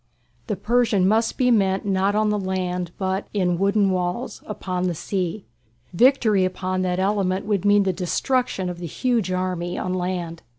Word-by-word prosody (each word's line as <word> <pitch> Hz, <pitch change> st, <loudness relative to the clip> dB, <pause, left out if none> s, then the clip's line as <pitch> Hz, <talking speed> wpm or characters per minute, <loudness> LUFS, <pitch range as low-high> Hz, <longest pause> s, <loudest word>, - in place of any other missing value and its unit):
The 210 Hz, -, -1 dB
Persian 215 Hz, -1 st, +2 dB
must 225 Hz, +3 st, +1 dB
be 250 Hz, -2 st, +3 dB
met 195 Hz, -4 st, +2 dB
not 195 Hz, +1 st, +1 dB
on 215 Hz, 0 st, +2 dB
the 210 Hz, -, 0 dB
land, 180 Hz, -2 st, -2 dB
but 190 Hz, 0 st, -2 dB
in 180 Hz, -3 st, +1 dB
"wooden 200 Hz, 0 st, +2 dB
walls" 180 Hz, +6 st, -2 dB
upon 185 Hz, -3 st, -3 dB
the 175 Hz, -, -2 dB
sea. 185 Hz, +3 st, -3 dB, 0.5 s
Victory 225 Hz, -2 st, +4 dB
upon 185 Hz, 0 st, -2 dB
that 180 Hz, -1 st, 0 dB
element 190 Hz, -1 st, 0 dB
would 205 Hz, -2 st, -1 dB
mean 205 Hz, 0 st, +5 dB
the 190 Hz, -1 st, 0 dB
destruction 195 Hz, +3 st, -1 dB
of 175 Hz, -1 st, -5 dB
the 175 Hz, -, -5 dB
huge 230 Hz, -, 0 dB
army 180 Hz, -1 st, -2 dB
on 185 Hz, -, -2 dB
land. 180 Hz, -2 st, -3 dB
190 Hz, 170 wpm, -23 LUFS, 180-210 Hz, 0.5 s, mean